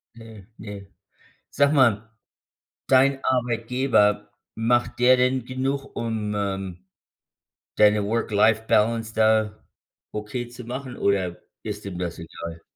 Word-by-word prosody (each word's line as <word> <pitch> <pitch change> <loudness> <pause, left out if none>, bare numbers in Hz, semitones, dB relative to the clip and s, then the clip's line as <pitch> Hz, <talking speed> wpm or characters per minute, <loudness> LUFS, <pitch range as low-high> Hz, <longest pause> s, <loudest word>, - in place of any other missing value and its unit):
Ne, 110 -4 -13
ne. 100 -2 -9 0.7
Sag 140 0 +3
mal, 115 -6 +3 0.8
dein 135 +1 +4
Arbeitgeber, 115 -4 +1 0.2
macht 120 +2 0
der 125 +1 +6
denn 125 0 +1
genug 135 +2 -3
um, 110 -2 -3
ähm, 95 -3 -4 0.9
deine 105 -1 +4
Work-Life-Balance 110 +1 +1
da 110 -1 +2 0.5
okay 105 +4 -5
zu 120 +1 -11
machen 125 +1 -6
oder 95 -3 0 0.2
ist 105 -1 -6
dem 95 -3 -6
das 90 -2 -4
egal? 85 0 -8
110 Hz, 110 wpm, -24 LUFS, 105-125 Hz, 0.9 s, der